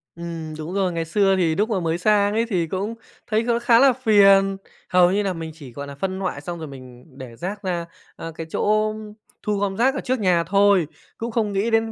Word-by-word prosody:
Ừm, 165 -2 -6
đúng 160 +4 -6
rồi. 190 -2 0
Ngày 165 -1 -3
xưa 195 +2 +2
thì 165 -4 +1
lúc 215 +5 0
mà 200 -4 0
mới 165 -1 -1
sang 205 +2 +2
ấy 230 +1 +1
thì 175 -5 0
cũng 200 +6 -3 0.3
thấy 220 +1 +1
kh 235 0 0
khá 235 -2 +5
là 270 -1 +6
phiền, 195 -5 +4 0.3
hầu 180 -1 +5
như 205 +2 +1
là 190 -2 -1
mình 165 -1 -6
chỉ, 140 -6 -12
gọi 140 +2 -7
là, 140 - -9
phân 190 +5 -3
loại 180 -7 -3
xong 170 +3 -6
rồi 160 - -6
mình 130 -2 -12
để 125 -4 -9
rác 195 - -5
ra, 175 -2 -2 0.3
à, 165 - -7
cái 165 - -6
chỗ 215 0 +1 0.5
thu 210 -1 -1
gom 195 -1 -2
rác 265 +3 +2
ở - - -3
trước 255 -1 -1
nhà 180 -4 +2
thôi, 200 -2 +3 0.3
cũng 230 +1 -4
không 215 -3 -1
nghĩ 210 +4 0
đến 225 0 +2
195 Hz, 235 wpm, -22 LUFS, 165-215 Hz, 0.5 s, là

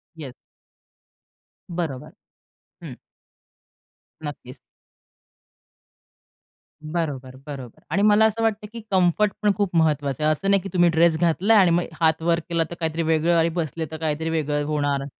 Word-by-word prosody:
Yes. 145 -6 -8 1.4
बरोबर. 165 -7 -4 0.7
हं. - - -8 1.3
नक्कीच. 135 -3 -8 2.3
बरोबर, 145 -5 -4
बरोबर 130 -5 -9
आणि 195 +5 +1
मला 210 +1 +5
असं 220 +1 0
वाटतं, 210 -1 -1
की 230 - -7
कम्फर्टपण 195 +3 +2
खूप 200 -4 -1
महत्त्वाचं 150 -3 +1
आहे. 155 - +3
असं 195 +6 -1
नाही, 200 -1 +4
की 195 - -7
तुम्ही 175 -1 +4
ड्रेस 165 0 +3
घातला 180 +6 +2
आणि 180 -3 +4
मग 175 +1 +2 0.2
हात 160 0 +3
वर 170 0 +1
केला 170 -1 +1
तर 170 - -6
काहीतरी 160 0 -1
वेगळं 160 +1 +2
आणि 165 0 +3
बसले 160 +1 -3
तर 160 - -5
काहीतरी 160 0 -2
वेगळं 150 -2 -1
होणार. 145 -2 -1
165 Hz, 140 wpm, -23 LUFS, 150-180 Hz, 2.3 s, मला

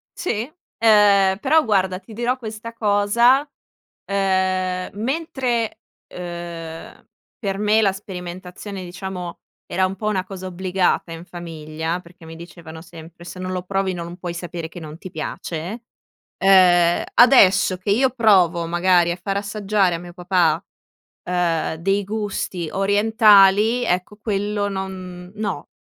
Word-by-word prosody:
Sì. 240 -4 -3 0.3
Ehm, 205 -3 +5
però 305 +7 +3
guarda, 190 -4 +1
ti 220 - -14
dirò 240 +3 -1
questa 225 -1 -8
cosa, 230 +6 +3 0.6
ehm, 185 -2 0
mentre, 245 -4 -2 0.4
uhm, 170 -2 -8 0.3
per 195 -4 -2
me 210 +1 +3
la 200 -3 +3
sperimentazione, 185 0 -8
diciamo, 180 -1 -7 0.3
era 190 - 0
un 185 +1 -3
po' 210 +2 -4
una 195 -3 0
cosa 185 -1 -8
obbligata 185 -1 -1
in 165 +1 -8
famiglia, 160 -1 -5
perché 170 -1 -17
mi 160 0 -10
dicevano 165 -1 -11
sempre: 165 0 -13
“Se 175 +2 -9
non 185 0 -4
lo 180 -1 -3
provi, 195 0 -1
non 170 0 -7
puoi 175 -2 -5
sapere 170 -1 -6
che 175 - -10
non 155 -1 -9
ti 185 - -9
piace”, 170 +7 -5 0.6
uhm, 175 -3 +5
adesso 200 -7 +6
che 190 +2 -2
io 255 +6 +3
provo 185 -8 +3
magari 175 0 +3
a 175 - -5
far 195 +1 -2
assaggiare 200 -2 0
a - - -3
mio 175 0 -11
papà, 180 0 +1 0.6
uhm, 175 -3 0
dei 195 +5 0
gusti 195 -5 -3
orientali, 210 +2 +4
ecco, 180 +3 -1
quello 205 -1 -2
no, 190 +1 -6
190 Hz, 135 wpm, -21 LUFS, 175-210 Hz, 0.6 s, adesso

